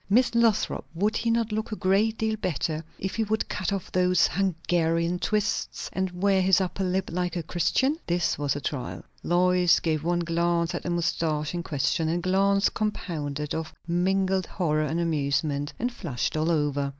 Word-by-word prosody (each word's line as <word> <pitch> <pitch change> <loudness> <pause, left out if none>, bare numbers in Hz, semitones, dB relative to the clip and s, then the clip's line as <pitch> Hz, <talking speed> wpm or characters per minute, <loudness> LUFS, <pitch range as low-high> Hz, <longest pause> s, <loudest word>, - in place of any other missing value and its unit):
Miss 240 +5 +4
Lothrop, 235 -3 +2
would 205 +6 +1
he 230 - -1
not 230 -1 +1
look 220 +1 -2
a - - -1
great 210 +3 +2
deal 220 0 0
better 160 -5 -2
if 190 - -4
he 225 - +2
would 220 +1 -1
cut 190 -1 -2
off 195 -3 -3
those 180 -2 +3
Hungarian 170 -1 0
twists, 210 +2 -1
and 190 0 0
wear 195 -1 +4
his 185 0 +4
upper 190 +1 -2
lip 185 +1 -1
like 180 +1 -1
a 170 - -2
Christian?" 260 - +1
This 175 0 +1
was 145 -1 -1
a 145 - -4
trial! 140 -4 -4 0.2
Lois 180 -1 +3
gave 155 -2 -1
one 175 +1 +1
glance 170 0 0
at - - -3
the - - -4
moustache 165 -3 -1
in 175 - -2
question, 160 +1 0
a 170 - +1
glance 195 +3 +2
compounded 150 -8 -3
of 160 -1 -4
mingled 190 +2 +1
horror 155 -4 0
and 160 +3 -1
amusement, 145 -2 0
and 245 +2 -2
flushed 145 - -3
all 155 +2 +1
over. 145 -3 +1
175 Hz, 180 wpm, -26 LUFS, 160-195 Hz, 0.2 s, Miss